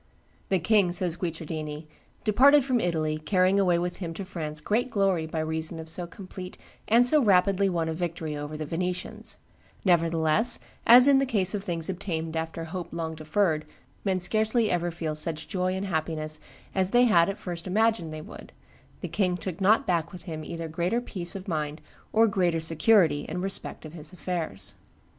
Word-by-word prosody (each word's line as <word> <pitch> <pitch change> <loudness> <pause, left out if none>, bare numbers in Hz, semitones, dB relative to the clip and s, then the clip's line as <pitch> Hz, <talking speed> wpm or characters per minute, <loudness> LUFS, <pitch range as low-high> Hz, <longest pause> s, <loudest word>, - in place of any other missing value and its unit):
"The 190 - +3
king," 195 +1 +3
says 180 -2 0
Guicciardini, 160 -3 -5 0.4
"departed 270 +6 +5
from 255 -3 +1
Italy, 155 -5 -1
carrying 185 +4 +2
away 180 -3 +3
with 175 +1 -2
him 165 -3 -5
to 195 - -5
France 155 -5 -5
great 225 +11 0
glory 195 -7 +1
by 160 0 -2
reason 160 +1 -2
of 160 0 -7
so 170 +2 -4
complete 185 0 -9 0.3
and 235 +3 +5
so 300 +4 +5
rapidly 195 -2 +3
won 170 -3 -1
a 160 - -1
victory 165 -2 -3
over 145 +1 -5
the 155 - -4
Venetians; 180 +3 -4 0.5
nevertheless, 165 +5 +3 0.3
as 245 +3 +9
in 275 -1 +6
the 275 - +2
case 195 -5 +1
of 200 -2 -3
things 170 -4 -3
obtained 165 -4 -3
after 165 +1 -3
hope 175 +2 -5
long 165 -1 -3
deferred 155 +1 0 0.4
men 190 -2 +1
scarcely 220 +4 +2
ever 175 0 0
feel 165 -2 -4
such 155 0 -5
joy 185 -2 -1
and 190 +1 -3
happiness 155 -3 -1 0.3
as 190 -1 +1
they 245 +4 +5
had 175 -8 +5
at 195 - -3
first 175 -1 -6
imagined 215 -4 +1
they 155 0 -7
would, - - -12 0.5
the - - -3
king 180 -3 0
took 180 0 -6
not 210 +4 +4
back 170 -1 0
with 180 - -10
him 160 -3 -6
either 165 +1 -5
greater 175 +8 -1
peace 180 -7 -7
of 190 0 -7
mind 155 -3 -2 0.3
or 225 +1 +5
greater 180 -6 +1
security 160 -1 +3
in 180 - -3
respect 190 -3 -4
of 155 - -9
his 155 -1 -9
affairs." 175 - -3
175 Hz, 185 wpm, -27 LUFS, 160-195 Hz, 0.5 s, as